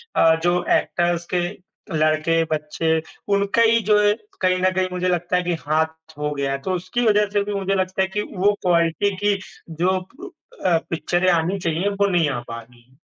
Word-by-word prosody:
अ 160 Hz, 0 st, +5 dB
जो 175 Hz, 0 st, +2 dB
एक्टर्स 175 Hz, 0 st, -1 dB
के 180 Hz, -, +2 dB, 0.6 s
लड़के, 155 Hz, +2 st, +2 dB
बच्चे 160 Hz, +1 st, 0 dB, 0.3 s
उनका 200 Hz, +3 st, +2 dB
ही 230 Hz, 0 st, +5 dB
जो 210 Hz, 0 st, +6 dB
है 205 Hz, 0 st, +4 dB, 0.3 s
कहीं 185 Hz, -1 st, +3 dB
न 185 Hz, -, +3 dB
कहीं 185 Hz, 0 st, +1 dB
मुझे 180 Hz, 0 st, -1 dB
लगता 175 Hz, 0 st, 0 dB
है 180 Hz, -, 0 dB
कि 175 Hz, 0 st, -1 dB
हाथ 160 Hz, 0 st, -2 dB
हो 150 Hz, 0 st, -2 dB
गया 140 Hz, -1 st, -1 dB
है। 135 Hz, -, -1 dB
तो 190 Hz, -, -3 dB
उसकी 185 Hz, +7 st, -2 dB
वजह 210 Hz, -1 st, +4 dB
से 205 Hz, -1 st, +2 dB
भी 205 Hz, +1 st, -4 dB
मुझे 195 Hz, 0 st, -1 dB
लगता 185 Hz, 0 st, -1 dB
है 190 Hz, -, +2 dB
कि 210 Hz, +2 st, -2 dB, 0.2 s
वो 205 Hz, +3 st, +3 dB
क्वालिटी 175 Hz, +3 st, +2 dB
की 205 Hz, 0 st, +1 dB, 0.4 s
जो 185 Hz, +2 st, +2 dB, 0.7 s
अ, 170 Hz, -2 st, +4 dB
पिक्चरें 175 Hz, +2 st, 0 dB
आनी 170 Hz, +3 st, +1 dB
चाहिए, 170 Hz, +3 st, 0 dB
वो 200 Hz, 0 st, +1 dB
नहीं 175 Hz, -5 st, +2 dB
आ 135 Hz, -4 st, -2 dB
पा 115 Hz, -, -5 dB
रही 120 Hz, +1 st, -20 dB
है। 130 Hz, -, -27 dB
180 Hz, 200 wpm, -22 LUFS, 160-195 Hz, 0.7 s, जो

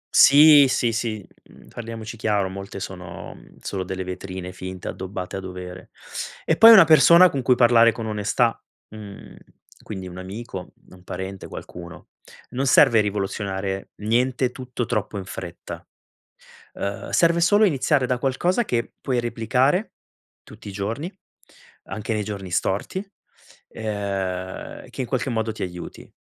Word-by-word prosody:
Sì, 145 Hz, 0 st, +8 dB
sì, 120 Hz, -2 st, +1 dB
sì, 110 Hz, -3 st, -3 dB, 0.2 s
mhmm, -, -, -18 dB
parliamoci 115 Hz, -1 st, -7 dB
chiaro, 105 Hz, -3 st, 0 dB
molte 100 Hz, +1 st, -7 dB
sono 90 Hz, -3 st, -8 dB, 0.3 s
solo 95 Hz, -2 st, -4 dB
delle 95 Hz, 0 st, -4 dB
vetrine 90 Hz, 0 st, -6 dB
finte 95 Hz, 0 st, -8 dB
addobbate 95 Hz, 0 st, -5 dB
a -, -, -3 dB
dovere. 90 Hz, -1 st, -8 dB, 0.6 s
E 160 Hz, -, +2 dB
poi 225 Hz, +6 st, +9 dB
una 205 Hz, -5 st, +10 dB
persona 170 Hz, +3 st, +7 dB
con 135 Hz, -, -2 dB
cui 125 Hz, 0 st, +3 dB
parlare 115 Hz, -1 st, +5 dB
con 115 Hz, 0 st, -6 dB
onestà, 110 Hz, +2 st, 0 dB, 0.3 s
mhmm, 105 Hz, -2 st, -11 dB, 0.5 s
quindi 95 Hz, -3 st, -7 dB
un 90 Hz, 0 st, -9 dB
amico, 95 Hz, 0 st, -8 dB, 0.2 s
un 90 Hz, -1 st, -16 dB
parente, 95 Hz, +1 st, -6 dB
qualcuno. 85 Hz, -1 st, -10 dB, 0.4 s
Non 135 Hz, +2 st, -1 dB
serve 130 Hz, -4 st, +6 dB
rivoluzionare 95 Hz, -1 st, -3 dB
niente, 125 Hz, +3 st, +1 dB
tutto 125 Hz, -1 st, -5 dB
troppo 110 Hz, -2 st, -2 dB
in 95 Hz, -, -5 dB
fretta. 90 Hz, -2 st, -8 dB, 0.9 s
Ehm, 100 Hz, 0 st, -5 dB
serve 170 Hz, 0 st, +3 dB
solo 205 Hz, +5 st, +5 dB
iniziare 145 Hz, -6 st, +2 dB
da 125 Hz, 0 st, 0 dB
qualcosa 175 Hz, -, 0 dB
che 120 Hz, -, -2 dB
puoi 130 Hz, -3 st, -1 dB
replicare, 125 Hz, -, 0 dB, 0.5 s
tutti 110 Hz, 0 st, -12 dB
i 100 Hz, -, -7 dB
giorni, 115 Hz, -, -4 dB, 0.8 s
anche 110 Hz, +1 st, -4 dB
nei 105 Hz, -1 st, -1 dB
giorni 100 Hz, -3 st, -6 dB
storti, 105 Hz, -, -1 dB, 0.6 s
ehm, 100 Hz, -4 st, -4 dB
che -, -, -8 dB
in 125 Hz, -, -2 dB
qualche 130 Hz, -1 st, -1 dB
modo 110 Hz, -2 st, -1 dB
ti 110 Hz, -, -4 dB
aiuti. 90 Hz, -1 st, -9 dB
110 Hz, 140 wpm, -23 LUFS, 95-125 Hz, 0.9 s, una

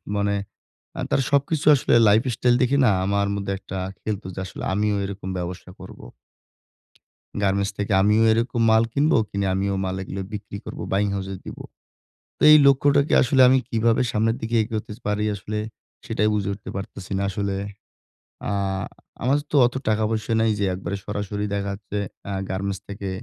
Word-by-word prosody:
মানে 100 Hz, 0 st, +1 dB, 0.7 s
তার -, -, +2 dB
সবকিছু 140 Hz, +2 st, +1 dB
আসলে 130 Hz, -, 0 dB, 0.2 s
lifestyle 120 Hz, +3 st, +3 dB
দেখে 130 Hz, +2 st, +3 dB
না, 115 Hz, -, +5 dB
আমার 100 Hz, +1 st, +1 dB
মধ্যে 100 Hz, -1 st, -3 dB
একটা 95 Hz, -, -7 dB, 0.2 s
খেলতো 105 Hz, -4 st, -4 dB
যে -, -, -5 dB
আসলে 95 Hz, -, -8 dB
আমিও 105 Hz, +1 st, +1 dB
এরকম 95 Hz, -1 st, -6 dB
ব্যবসা 90 Hz, +1 st, -6 dB
করবো। -, -, -11 dB, 1.4 s
গার্মেন্টস 100 Hz, 0 st, +1 dB
থেকে 100 Hz, 0 st, -1 dB
আমিও 105 Hz, +3 st, +4 dB
এরকম 115 Hz, +1 st, 0 dB
মাল 110 Hz, 0 st, +5 dB
কিনবো, 150 Hz, +3 st, +3 dB
কিনে 100 Hz, 0 st, -2 dB
আমিও 100 Hz, +1 st, 0 dB
মাল 95 Hz, 0 st, -2 dB
এগুলো 95 Hz, +1 st, -5 dB
বিক্রি 105 Hz, -1 st, -6 dB
করবো, -, -, -6 dB
buying 100 Hz, +1 st, +1 dB
house 95 Hz, 0 st, -4 dB
এ -, -, -5 dB
দিবো। -, -, -8 dB, 0.7 s
তো -, -, -36 dB
এই 155 Hz, -, +10 dB
লক্ষ্যটাকে 140 Hz, +1 st, +4 dB
আসলে 130 Hz, 0 st, +3 dB
আমি 130 Hz, +1 st, +5 dB
কিভাবে 115 Hz, 0 st, +2 dB
সামনের 110 Hz, +1 st, +1 dB
দিকে 115 Hz, +1 st, -2 dB
এগোতে 110 Hz, -1 st, -5 dB
স -, -, -23 dB
পারি 105 Hz, 0 st, 0 dB
আসলে, 105 Hz, +2 st, -5 dB, 0.5 s
সেটাই 105 Hz, +1 st, +1 dB
বুঝে 100 Hz, -2 st, -1 dB
উঠতে 100 Hz, -, -9 dB
পারতেছি 95 Hz, -1 st, -7 dB
না -, -, -1 dB
আসলে। 100 Hz, 0 st, -2 dB, 1.0 s
আ -, -, -1 dB, 0.7 s
আমাদের 140 Hz, +4 st, +2 dB
তো -, -, -1 dB
অতো 120 Hz, -, -1 dB
টাকা 110 Hz, 0 st, +2 dB
পয়সা 110 Hz, 0 st, -1 dB
নাই 110 Hz, 0 st, +3 dB
যে 100 Hz, -, +1 dB
একবারে 95 Hz, +2 st, -4 dB
সরাসরি 105 Hz, 0 st, -3 dB
দেখা 100 Hz, 0 st, -2 dB
যাচ্ছে 100 Hz, 0 st, -5 dB, 0.3 s
আ -, -, -2 dB, 0.2 s
গার্মেন্টস 95 Hz, 0 st, -3 dB
থেকে 100 Hz, -1 st, -5 dB
105 Hz, 170 wpm, -23 LUFS, 100-115 Hz, 1.4 s, এই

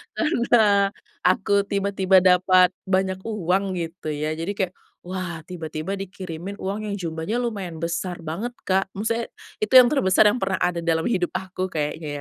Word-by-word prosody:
karena 220 Hz, -, +3 dB, 0.3 s
aku 200 Hz, +2 st, +2 dB
tiba-tiba 195 Hz, -2 st, +2 dB
dapat 185 Hz, 0 st, +5 dB, 0.2 s
banyak 190 Hz, 0 st, +1 dB
uang, 195 Hz, -2 st, 0 dB
gitu 170 Hz, -1 st, -5 dB
ya, 150 Hz, +1 st, -2 dB
jadi 165 Hz, +6 st, -3 dB
kayak, 185 Hz, -3 st, -1 dB, 0.3 s
wah, 180 Hz, -2 st, -4 dB
tiba-tiba 160 Hz, 0 st, -5 dB
dikirimin 190 Hz, -1 st, -6 dB
uang 200 Hz, +2 st, -3 dB
yang 200 Hz, -, -2 dB
jumlahnya 165 Hz, +4 st, -3 dB
lumayan 200 Hz, -9 st, -3 dB
besar 170 Hz, +2 st, -3 dB
banget, 170 Hz, +10 st, -3 dB, 0.2 s
Kak. 190 Hz, 0 st, +1 dB
Maksudnya, 230 Hz, +3 st, -1 dB, 0.3 s
itu 215 Hz, -, 0 dB
yang 250 Hz, -, +10 dB
terbesar 220 Hz, -7 st, +3 dB
yang 210 Hz, +4 st, +3 dB
pernah 190 Hz, -1 st, 0 dB
ada 175 Hz, -1 st, 0 dB
dalam 165 Hz, -1 st, 0 dB
hidup 180 Hz, -7 st, 0 dB
aku 185 Hz, 0 st, -4 dB
kayaknya 155 Hz, -1 st, -3 dB
190 Hz, 150 wpm, -23 LUFS, 170-200 Hz, 0.3 s, yang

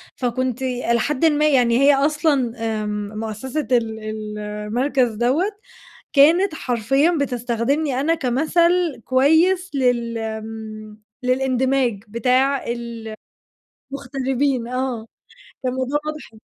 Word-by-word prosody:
فكنت 255 Hz, 0 st, -2 dB
إلى 245 Hz, -2 st, 0 dB
حدٍ 295 Hz, +5 st, 0 dB
ما 305 Hz, -1 st, +3 dB
يعني 245 Hz, -4 st, +3 dB
هي 280 Hz, 0 st, +6 dB
أصلًا 285 Hz, -4 st, +1 dB, 0.3 s
آمم، 210 Hz, 0 st, -4 dB
مؤسسة 225 Hz, +7 st, -4 dB
ال 225 Hz, -3 st, +1 dB
ال 215 Hz, -1 st, -6 dB
المركز 225 Hz, +5 st, -1 dB
دوّة 245 Hz, -, +1 dB, 0.7 s
كانت 320 Hz, +5 st, +5 dB
حرفيًا 270 Hz, +7 st, +1 dB
بتستخدمني 250 Hz, +2 st, -1 dB
أنا 325 Hz, +3 st, +2 dB
كمثل 320 Hz, +2 st, +1 dB
كويس 320 Hz, +8 st, +3 dB
لل 240 Hz, -3 st, +1 dB
آمم، 220 Hz, -1 st, -7 dB, 0.2 s
للإندماج 255 Hz, -3 st, +1 dB
بتاع 255 Hz, +5 st, +1 dB
ال 235 Hz, -2 st, -5 dB, 0.8 s
المغتربين 270 Hz, -2 st, -1 dB
آه، 250 Hz, -3 st, -3 dB, 0.6 s
فالموضوع 260 Hz, +3 st, -1 dB
واضح 305 Hz, -5 st, -6 dB
255 Hz, 100 wpm, -21 LUFS, 230-280 Hz, 0.8 s, هي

